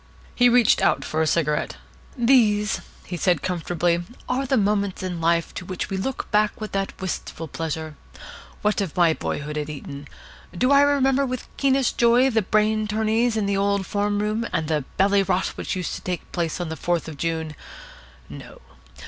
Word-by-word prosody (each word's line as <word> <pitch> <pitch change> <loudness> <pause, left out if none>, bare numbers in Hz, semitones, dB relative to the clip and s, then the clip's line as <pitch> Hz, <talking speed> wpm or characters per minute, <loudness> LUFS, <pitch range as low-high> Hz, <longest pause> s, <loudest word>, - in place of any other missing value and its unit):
He 245 0 +5
reached 240 -2 +4
out - - +2
for 155 - -1
a 160 - +2
cigarette. 150 -1 0 0.4
"These," 220 -5 +3 0.2
he 175 - -5
said, 175 -3 +1
comfortably, 175 -1 0 0.2
"are 265 +2 -1
the 265 - +2
moments 200 -2 0
in 180 -3 -4
life 170 0 +1
to - - -6
which 185 +2 -5
we 190 - -1
look 255 +8 -4
back 210 0 +2
with 215 -1 -5
that 195 0 -3
wistful 175 -3 -5
pleasure. 160 0 -4 0.7
What 210 0 +2
of 185 -5 -4
my 170 -2 +5
boyhood 150 -1 -4
at 150 0 -4
Eton? 145 -1 -8 0.5
Do 255 +8 +2
I 280 0 +7
remember 280 -1 +3
with 255 -2 -2
the - - -19
keenest 270 -2 +1
joy 245 +3 +5
the 220 -1 +2
brain 215 +2 +1
tourneys 220 +2 +1
in 210 - 0
the 200 0 0
old 200 0 +1
form 205 +1 0
room, 215 +2 -1
and 160 - -1
the 150 -4 -1
bally 200 +1 +4
rot 190 -1 0
which - - -4
used 180 -2 -3
to - - -6
take 180 -1 -5
place 170 -2 -2
on 175 -2 -3
the 160 - -4
Fourth 170 0 -1
of 160 - -7
June? 160 0 -2 0.7
No. - - -11
195 Hz, 190 wpm, -23 LUFS, 165-220 Hz, 0.7 s, I